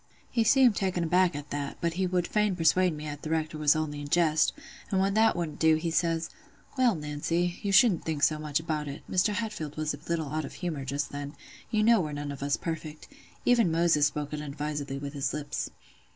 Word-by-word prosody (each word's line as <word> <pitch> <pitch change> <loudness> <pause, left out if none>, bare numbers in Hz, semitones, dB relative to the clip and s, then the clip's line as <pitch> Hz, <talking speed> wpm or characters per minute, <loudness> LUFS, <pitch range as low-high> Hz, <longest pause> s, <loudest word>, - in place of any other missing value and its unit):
"He 235 -3 +2
seemed 245 0 +5
taken 185 -3 0
aback 175 0 +3
at 145 0 -7
that; 145 -1 -4
but 170 -1 -1
he 185 +1 0
would 180 -1 0
fain 210 -1 +1
persuade 175 +1 +3
me 150 - -7
"at 145 -1 -6
the 155 - -6
Rector 155 -1 -1
was 150 0 +4
only 150 -2 -2
in 145 - -6
jest; 160 0 +3 0.4
and 190 - +1
when 195 +1 +2
that 220 +1 +4
wouldn't 165 -4 -4
do, 160 -1 +5
he 165 +1 -2
says, 165 -1 +1 0.5
'Well, 250 -5 +3
Nancy, 165 +4 -2
you 200 - -1
shouldn't 195 -3 +5
think 155 -3 -3
so 155 -1 +3
much 150 -1 -1
about 155 -2 -3
it: 140 0 -7
Mr. 185 +3 +2
Hatfield 210 -11 -4
was 155 -1 -1
a 145 - -8
little 160 -4 -1
out 155 +1 -1
of - - -7
humour 160 -7 -4
just 140 +2 -2
then: 145 +1 -6 0.3
you 215 -1 +1
know 230 -2 +5
we're 150 -3 -4
none 145 0 -4
of 140 - -8
us 140 0 0
perfect—even 170 - -2
Moses 165 -3 +3
spoke 150 0 -5
unadvisedly 150 -1 -4
with 140 +1 -6
his 140 -2 -2
lips. 145 -1 -3
160 Hz, 215 wpm, -28 LUFS, 150-180 Hz, 0.5 s, seemed